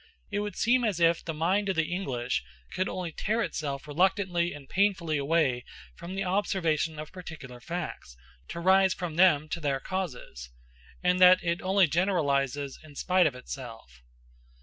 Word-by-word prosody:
It 205 - -1
would 205 -2 -4
seem 245 +2 +2
as 205 -7 0
if 170 0 +3
the 165 - -3
mind 185 +6 0
of 190 - 0
the 165 +1 0
English 125 - -2 0.3
could 185 - -1
only 180 -3 -4
tear 220 +8 -1
itself 140 -7 -4
reluctantly 175 +2 +1
and 145 -2 -10
painfully 185 -6 +1
away 140 -4 +1 0.3
from 180 +1 -8
the 195 - -1
observation 175 -5 0
of 155 0 -7
particular 160 -9 -9
facts, 135 - -6 0.3
to - - -6
rise 190 +1 +4
from 170 -3 -5
them 155 -4 +4
to 170 - -3
their 140 -4 -1
causes; 135 - -5 0.5
and 180 0 +2
that 185 0 +7
it 170 0 -1
only 190 0 +4
generalizes 145 -6 0
in 150 -2 -14
spite 180 +2 +3
of 140 - -3
itself. 115 - -9
170 Hz, 165 wpm, -28 LUFS, 145-185 Hz, 0.5 s, that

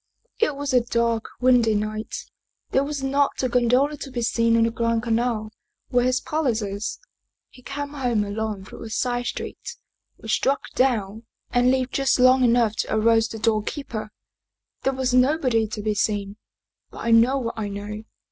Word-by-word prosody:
" 485 - -43
It 295 - -4
was 285 -1 -3
a 250 - +5
dark, 235 -1 0
windy 245 -3 +4
night; 215 +1 -3 0.5
there 270 - +3
was 285 -1 -4
not 275 0 +1
a - - +3
gondola 250 +4 +2
to 275 - -7
be 245 -2 -3
seen 230 0 +2
on 230 - +4
the 230 - +1
Grand 230 0 0
Canal, 230 -2 -1 0.4
where 245 0 +2
his 255 0 +2
palace 265 -8 -1
is. 200 +1 -4 0.5
He 250 - -16
came 285 +3 -5
home 250 -7 0
alone 205 -1 -4
through - - -11
a 225 - -7
side 245 +1 -1
street, - - -6 0.4
was 220 -1 -3
struck 275 +5 0
down, 225 -4 0 0.2
and 245 +1 +3
lived 260 0 0
just 275 -1 +2
long 255 +1 +6
enough 235 -3 +3
to - - -1
arouse 225 +1 +3
the 225 - -7
doorkeeper. 220 +1 -2 0.7
There 270 - 0
was 260 -1 -1
nobody 255 -4 +3
to 210 0 -6
be 215 0 +1
seen. 205 -1 -1 0.5
But - - -9
I 230 - +1
know 235 +4 +5
what 235 -4 -3
I 220 -2 -3
know. 205 +1 -6
235 Hz, 180 wpm, -24 LUFS, 220-260 Hz, 0.7 s, long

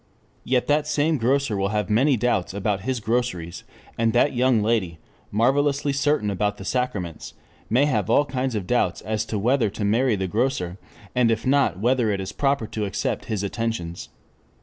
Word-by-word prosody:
Yet 125 -1 +1
that 150 +1 +1
same 150 +1 +1
grocer 130 0 +1
will 95 0 0
have 105 +1 -1
many 130 +5 +3
doubts 105 -5 0
about 100 -1 -1
his 130 +3 -2
groceries, 110 -7 -2 0.4
and 115 -1 +2
that 125 +4 +3
young 125 -3 +2
lady, 105 -7 0 0.3
marvelously 140 +5 +1
certain 140 -7 +1
about 105 +1 -1
the 95 - -9
sacraments, 105 -11 -3 0.3
may 125 +6 +4
have 145 - 0
all 145 - +4
kinds 130 -2 -2
of 100 -4 -2
doubts 120 +5 0
as 110 0 -2
to 110 - -3
whether 120 +2 +2
to 105 +1 -4
marry 115 +3 +2
the 95 -1 -2
grocer, 100 -3 -1 0.3
and 125 -2 +3
if 115 +2 0
not 135 -7 +2
whether 120 +2 +1
it 100 -2 0
is 95 +1 -4
proper 140 -3 0
to 110 -1 -3
accept 100 - -2
his 105 -2 -2
attentions. 100 -5 -3
115 Hz, 180 wpm, -24 LUFS, 105-130 Hz, 0.4 s, may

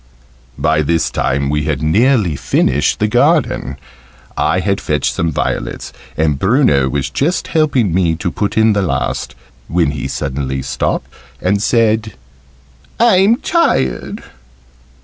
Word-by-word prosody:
By 75 - +1
this 80 +2 0
time 70 +1 -1
we 75 +1 -1
had 75 -1 -2
nearly 105 - +2
finished 70 +1 +1
the 105 - +1
garden. 125 - +1 0.6
I - - +1
had - - -1
fetched - - -1
some 80 0 -1
violets, - - -3 0.2
and 75 -3 +1
Bruno 95 - +3
was 70 0 -2
just 155 - -1
helping 135 - +1
me 85 -2 +1
to 85 +2 -3
put 105 0 -3
in 110 0 +4
the 100 - +1
last, 70 -8 -2 0.3
when 85 -3 +1
he 75 - -4
suddenly 65 -1 -3
stopped - - -2 0.3
and 100 +2 0
said 110 -2 +1 0.9
"I'm 220 -2 +5
tired." 65 - 0
90 Hz, 130 wpm, -16 LUFS, 70-115 Hz, 0.9 s, I'm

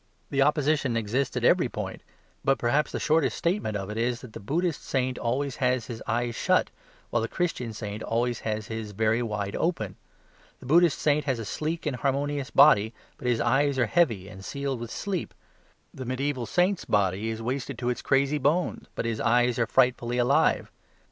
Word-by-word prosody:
The 140 -1 +2
opposition 145 -3 +2
exists 115 +5 -1
at - - -2
every - - +4
point; - - -5 0.4
but 135 0 +3
perhaps 140 +6 +1
the - - -3
shortest 160 +1 +2
statement 170 - 0
of 95 +1 -5
it 105 - -5
is 120 +1 0
that 125 -4 -11
the - - -7
Buddhist 160 - -1
saint 130 -1 -1
always 130 +3 -1
has 125 -2 +1
his 115 -1 -7
eyes 120 +1 0
shut, - - +1 0.4
while 120 - +1
the 115 - -1
Christian 125 -9 -2
saint 105 -1 -6
always 120 +1 -1
has 110 -1 -3
them 110 0 -3
very 110 +3 +1
wide 105 -4 -3
open. 110 - -1 0.6
The - - -13
Buddhist 165 +3 +4
saint 150 -1 +1
has 135 -4 0
a 115 - -5
sleek 155 - -3
and 140 -4 -1
harmonious 140 +1 -1
body, 110 -6 +5 0.2
but 125 - -4
his 120 -2 +2
eyes 135 +4 +2
are 125 - +3
heavy 115 - +1
and 95 -2 -11
sealed 140 +1 -3
with 120 -1 -6
sleep. 190 +6 -4 0.6
The 130 - -7
mediaeval 130 -1 -2
saint's 180 +2 +1
body 100 +1 +1
is 110 0 -4
wasted 130 +1 -3
to 120 +1 -1
its 125 - -2
crazy 140 +2 +2
bones, 155 +6 0
but - - -2
his 115 -2 -2
eyes 120 +1 +3
are 120 - +2
frightfully 125 -2 +2
alive. 125 +3 +2
125 Hz, 190 wpm, -27 LUFS, 115-145 Hz, 0.6 s, body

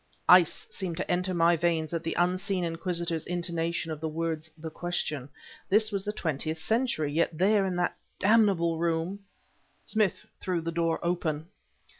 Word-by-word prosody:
Ice 180 -3 +6
seemed 180 -4 -3
to - - -2
enter 180 +1 0
my 170 -1 +4
veins 165 -1 0
at 165 - -1
the 165 - -2
unseen 185 +1 +1
inquisitor's 170 -1 -2
intonation 170 -1 -2
of 155 - -4
the 160 - -1
words 160 0 -3
"the 160 0 -7
question." 155 -6 -3 0.4
This 215 +2 +4
was 200 -2 -1
the 210 - -2
Twentieth 160 -4 -2
Century, 175 - 0
yet 165 0 +1
there, 195 +2 +3
in 185 - -2
that 175 0 0 0.2
damnable 190 -6 +3
room... 170 +3 -1 0.7
Smith 215 -4 +1
threw 180 -2 -1
the 165 0 -3
door 165 0 +1
open. 165 -3 -1
170 Hz, 160 wpm, -28 LUFS, 160-185 Hz, 0.7 s, Ice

